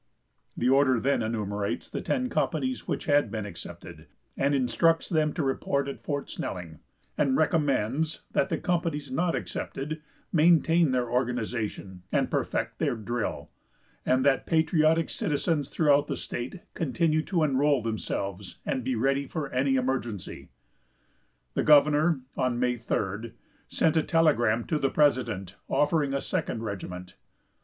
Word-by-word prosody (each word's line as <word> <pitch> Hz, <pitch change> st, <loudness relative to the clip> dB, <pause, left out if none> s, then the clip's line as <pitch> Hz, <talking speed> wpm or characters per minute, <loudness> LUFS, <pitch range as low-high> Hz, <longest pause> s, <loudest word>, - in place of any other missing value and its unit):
The 120 Hz, -, +1 dB
order 130 Hz, -1 st, +4 dB
then 140 Hz, +2 st, +1 dB
enumerates 105 Hz, -4 st, -2 dB
the -, -, -5 dB
ten 255 Hz, -2 st, 0 dB
companies 260 Hz, +1 st, -1 dB
which -, -, -2 dB
had 145 Hz, -5 st, +3 dB
been 110 Hz, -1 st, -4 dB
accepted, 85 Hz, -5 st, -10 dB, 0.3 s
and 140 Hz, +1 st, +1 dB
instructs 165 Hz, +5 st, +2 dB
them 155 Hz, -3 st, +1 dB
to 160 Hz, -, -1 dB
report 140 Hz, +1 st, 0 dB
at 140 Hz, -, -6 dB
Fort 145 Hz, -1 st, -3 dB
Snelling, 85 Hz, -4 st, -6 dB, 0.4 s
and 140 Hz, -3 st, +3 dB
recommends 150 Hz, -2 st, +1 dB
that 190 Hz, -1 st, +1 dB
the 165 Hz, -, 0 dB
companies 165 Hz, -6 st, -1 dB
not 165 Hz, +5 st, +1 dB
accepted 150 Hz, +3 st, -4 dB, 0.3 s
maintain 165 Hz, 0 st, +4 dB
their 125 Hz, -1 st, 0 dB
organization 115 Hz, -6 st, -2 dB
and -, -, +1 dB
perfect -, -, -2 dB
their -, -, +1 dB
drill, 115 Hz, +1 st, -4 dB, 0.5 s
and 130 Hz, +1 st, +2 dB
that 140 Hz, -1 st, +2 dB
patriotic 160 Hz, 0 st, +3 dB
citizens 150 Hz, -1 st, -1 dB
throughout 145 Hz, -2 st, +3 dB
the -, -, -3 dB
state 130 Hz, +10 st, -6 dB
continue 155 Hz, +1 st, +1 dB
to 170 Hz, -5 st, +1 dB
enroll 140 Hz, -2 st, +2 dB
themselves, 100 Hz, -4 st, -4 dB
and 130 Hz, -, -1 dB
be 130 Hz, +1 st, -1 dB
ready 135 Hz, +4 st, +1 dB
for 150 Hz, -3 st, -4 dB
any 135 Hz, +1 st, +2 dB
emergency. 125 Hz, -6 st, -3 dB, 1.0 s
The -, -, +1 dB
governor, 150 Hz, +1 st, +5 dB
on 125 Hz, -2 st, 0 dB
May 125 Hz, 0 st, +1 dB
3d, 110 Hz, 0 st, -3 dB, 0.3 s
sent 160 Hz, -, +1 dB
a 160 Hz, -, +4 dB
telegram 120 Hz, -10 st, +2 dB
to 155 Hz, -, -1 dB
the 135 Hz, -, +1 dB
president, 115 Hz, -, +1 dB
offering 145 Hz, -2 st, +2 dB
a 140 Hz, -, -1 dB
second 115 Hz, -, -2 dB
regiment. 90 Hz, -3 st, -6 dB
135 Hz, 140 wpm, -27 LUFS, 115-155 Hz, 1.0 s, governor